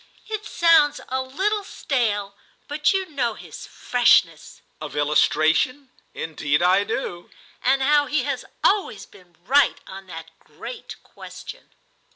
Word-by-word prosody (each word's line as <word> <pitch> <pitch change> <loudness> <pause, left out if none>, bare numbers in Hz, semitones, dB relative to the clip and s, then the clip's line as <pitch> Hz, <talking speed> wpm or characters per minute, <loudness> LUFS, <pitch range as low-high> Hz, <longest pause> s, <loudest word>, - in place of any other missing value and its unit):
"It 435 -1 -5
sounds 330 -4 +4
a 260 +1 -1
little 390 +11 -1
stale, 210 - -2 0.3
but 295 0 +1
you 385 -1 0
know 260 -9 -2
his - - -11
freshness." 180 -10 +2 0.2
"Of 150 -1 -7
illustration? 155 - +1 0.2
Indeed 150 0 -1
I 185 +3 +4
do!" 175 -6 -5 0.3
"And 270 +1 +2
how 290 +1 +3
he 300 -4 0
has 280 -2 -3 0.2
always 375 - +1
been 175 -2 -20
right 280 +5 +3
on 190 0 -11
that 165 -2 -9
great 485 -3 -9
question." - - -11
255 Hz, 130 wpm, -23 LUFS, 180-295 Hz, 0.3 s, sounds